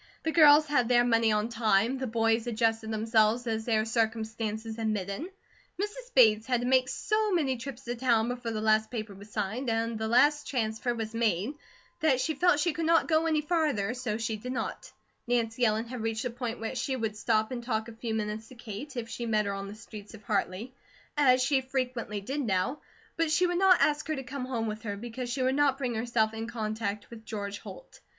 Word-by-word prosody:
The 320 - 0
girls 305 -1 +7
had 255 -5 +1
their 240 -1 +5
money 230 -2 +3
on 210 +1 +1
time, 225 +2 +2
the 260 - -2
boys 225 0 +1
adjusted 225 -1 0
themselves 220 +1 +2
as 220 -1 -2
their 220 -2 +2
circumstances 220 0 -2
admitted. 215 - -2 0.5
Mrs. 450 +5 -4
Bates 220 -3 +5
had 245 -2 +1
to - - -2
make 255 0 +3
so 430 +5 0
many 295 -8 +1
trips 260 +1 -8
to 240 - -3
town, 235 -2 +2
before 245 -1 -4
the 220 -1 -3
last 220 0 +3
paper 215 -4 -5
was 200 +2 -13
signed, 220 +5 -2
and 225 0 -1
the 220 - -1
last 290 +6 +4
transfer 235 -1 -1
was 225 -1 -4
made, 225 - 0 0.5
that 280 -5 +3
she 315 +5 0
felt 345 0 +3
she 345 +1 +1
could 320 +1 -2
not 330 0 +4
go 320 0 +2
any 310 -2 +2
farther, 300 - 0
so 245 -4 -3
she 225 -1 -2
did 250 +4 -6
not. 230 - -4 0.4
Nancy 240 0 0
Ellen 220 +1 +1
had 240 0 -6
reached 225 0 -2
the 250 - -2
point 240 -1 -4
where 225 +2 -4
she 260 +1 -2
would 225 -4 -2
stop 220 +1 +1
and 240 -2 -4
talk 220 -2 -2
a 230 - -9
few 225 0 -4
minutes 215 +1 -3
to 255 - -14
Kate, 240 +4 -8
if 235 -1 -3
she 235 +1 -5
met 215 -2 +2
her 200 - -2
on 195 0 -5
the 200 - -8
streets 215 -1 -11
of 215 - -15
Hartley, 200 +3 -2 0.4
as 255 -3 +4
she 270 0 +2
frequently 255 -5 -3
did 270 +8 -3
now; 210 +4 -1 0.4
but 330 -1 +1
she 360 +4 +3
would 350 0 0
not 380 -2 +6
ask 295 0 +2
her 310 - -1
to 270 - -5
come 260 0 -5
home 240 -3 -2
with 215 0 -4
her, 205 -3 -4
because 240 +3 -6
she 260 +2 -1
would 260 +1 +2
not 280 -1 +3
bring 255 -3 -2
herself 225 -1 0
in 225 +1 -5
contact 215 -2 -4
with 225 -1 -10
George 205 -2 -5
Holt. - - -12
230 Hz, 220 wpm, -29 LUFS, 220-260 Hz, 0.5 s, girls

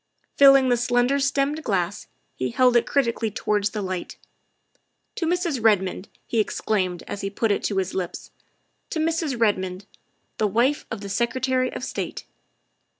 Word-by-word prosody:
Filling 275 -2 +7
the 245 - +3
slender 245 +3 +2
stemmed 280 +3 0
glass, 195 - -1 0.3
he 130 - -2
held 250 - +3
it 240 - +3
criti 265 -5 +2
cally 225 -1 -2
towards 210 0 0
the 210 -2 -4
light. 185 -1 -5 0.5
" - - -45
To 330 - -1
Mrs. 340 - -1
Redmond!" 190 -3 +2 0.2
he 230 - -1
exclaimed 190 -4 -1
as 200 - -6
he 195 - -2
put 215 +2 0
it 200 - 0
to 200 - -1
his 190 -1 -1
lips; 180 -2 -5 0.3
" - - -47
to - - -4
Mrs. 315 -5 -1
Redmond, 190 -3 0 0.5
the 215 - +3
wife 240 +8 +1
of 225 -3 -5
the 200 - -6
Secretary 255 +3 0
of - - -6
State!" - - -5
230 Hz, 170 wpm, -24 LUFS, 200-265 Hz, 0.5 s, Filling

